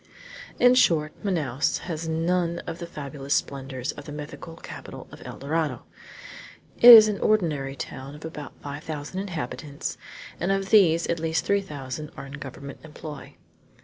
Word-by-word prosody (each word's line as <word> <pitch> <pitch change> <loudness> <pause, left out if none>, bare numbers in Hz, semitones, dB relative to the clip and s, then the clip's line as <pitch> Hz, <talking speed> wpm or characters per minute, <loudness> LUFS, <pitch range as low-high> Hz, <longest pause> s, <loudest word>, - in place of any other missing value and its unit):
In 245 0 +7
short, 160 -11 +3
Manaos 150 - 0
has 165 -2 -4
none 170 +1 0
of 165 0 -6
the 170 - -5
fabulous 140 -3 -3
splendors 135 -1 -2
of 145 - -11
the - - -8
mythical 150 +2 -8
capital - - -9
of - - -12
El - - -8
Dorado. 145 -2 -1 1.0
It 245 - +11
is 220 -2 +12
an 210 -2 -2
ordinary 150 -10 +1
town 135 +1 -7
of 150 - -10
about 150 -2 -8
five 145 +1 -6
thousand 155 +4 -5
inhabitants, 145 -6 -5 0.4
and 180 +3 0
of 195 0 -1
these 170 -6 +6
at 170 - -1
least 160 -2 0
three 200 0 +2
thousand 145 -3 -6
are - - -6
in 135 - -10
government 140 0 -8
employ. 150 -2 -9
155 Hz, 160 wpm, -26 LUFS, 140-170 Hz, 1.0 s, is